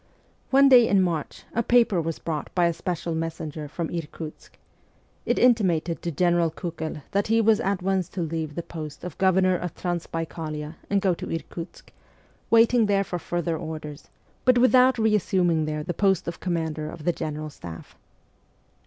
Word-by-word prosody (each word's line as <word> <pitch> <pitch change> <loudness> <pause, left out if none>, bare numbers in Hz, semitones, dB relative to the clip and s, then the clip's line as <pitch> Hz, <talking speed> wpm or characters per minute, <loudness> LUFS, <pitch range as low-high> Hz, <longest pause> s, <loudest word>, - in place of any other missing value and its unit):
One 275 +1 +6
day 245 -4 +7
in 200 - +4
March 165 -4 -3
a 235 - +1
paper 230 -6 +3
was 165 0 -3
brought 155 -3 -4
by 175 -2 +4
a 170 - +2
special 170 0 -3
messenger 160 -2 -4
from 160 +2 -4
Irkutsk. 160 -1 -7 0.7
It - - +2
intimated 185 -9 +2
to 175 - -3
General 170 +1 +2
Kiikel 160 -3 -5
that 200 +1 +1
he 225 +1 +3
was 225 -1 +4
at 195 -1 -1
once 190 -2 0
to - - 0
leave 160 -2 -4
the 170 - -3
post 155 -3 -8
of 180 -4 -6
Governor 185 -1 +3
of 180 -1 -4
Transbaikalia 165 -3 -4 0.2
and 200 -1 +2
go 190 -2 +2
to - - -6
Irkutsk, 165 +1 -7 0.6
waiting 230 0 +5
there 200 -1 +2
for 180 -2 -4
further 170 -1 -2
orders, 155 -1 -7 0.3
but 255 -1 +5
without 255 +1 +5
reassuming 185 -7 +2
there 150 0 -3
the 175 - -3
post 195 -2 +1
of 170 - -5
commander 160 -3 -2
of 160 -1 -9
the 175 - +1
general 155 -1 -5
staff. 85 -11 -10
170 Hz, 170 wpm, -25 LUFS, 160-195 Hz, 0.7 s, day